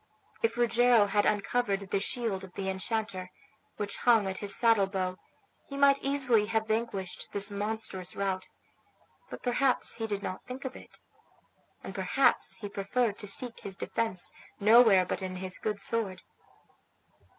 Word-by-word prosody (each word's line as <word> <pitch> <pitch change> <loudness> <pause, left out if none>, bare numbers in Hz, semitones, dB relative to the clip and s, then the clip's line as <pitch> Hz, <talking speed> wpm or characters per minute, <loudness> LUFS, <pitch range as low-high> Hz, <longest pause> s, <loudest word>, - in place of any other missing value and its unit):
If 460 - 0
Rogero 240 -2 +4
had 205 +1 +2
uncovered 205 0 0
the 200 - +2
shield 210 -3 -2
of 185 -1 -11
the 190 -1 -3
enchanter, 190 -1 -3 0.5
which 205 -1 -3
hung 230 -4 +4
at 190 - -4
his 205 -1 +1
saddle 225 -4 +4
bow, 185 -1 -2 0.5
he 275 - -7
might 280 0 +5
easily 265 -6 +2
have 220 0 0
vanquished 215 -4 -3
this 200 +1 +2
monstrous 205 -3 -4
rout; 190 -1 -2 0.8
but - - -9
perhaps 250 0 +1
he 225 -1 -3
did 205 -1 -3
not 185 -1 -5
think 260 +2 -7
of 260 - -5
it, - - -14 0.9
and - - -7
perhaps - - +2
he 205 - -6
preferred 205 +3 -1
to 205 - -4
seek 235 +4 -1
his 195 -1 -5
defence 205 -6 -2 0.3
nowhere 215 -3 +6
but 185 - -3
in 185 -1 -4
his 185 0 -4
good 210 -2 -2
sword. 200 -4 -1
210 Hz, 155 wpm, -29 LUFS, 195-235 Hz, 0.9 s, nowhere